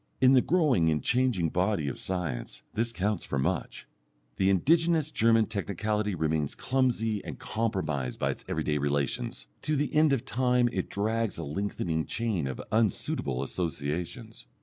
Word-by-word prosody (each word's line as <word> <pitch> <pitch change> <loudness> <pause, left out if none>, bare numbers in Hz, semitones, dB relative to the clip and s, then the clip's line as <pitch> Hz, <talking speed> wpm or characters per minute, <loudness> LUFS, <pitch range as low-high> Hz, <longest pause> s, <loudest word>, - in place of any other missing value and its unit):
In 130 +1 +6
the 130 - +6
growing 145 - +3
and 75 -2 0
changing 120 -9 +2
body 90 -3 0
of 70 - -4
science 90 -10 -4
this 115 +2 0
counts 105 -1 -1
for 70 - -2
much. 65 - -2 0.5
The 95 - +3
indigenous 160 - +3
German 115 -3 +4
technicality 105 0 -1
remains 80 -3 0
clumsy 120 -5 0
and 75 -7 -7
compromised 95 - -2
by - - +1
its - - -7
everyday 75 -1 0
relations, 70 -1 -1 0.2
to 155 +1 0
the 145 +1 -1
end 155 -1 +5
of 130 -2 0
time 125 -1 +2
it - - -2
drags 110 +1 -1
a 85 - -4
lengthening 80 0 -2
chain 110 - -1
of 65 - -5
unsuitable 95 - 0
associations. 85 - -4
105 Hz, 150 wpm, -29 LUFS, 80-120 Hz, 0.5 s, In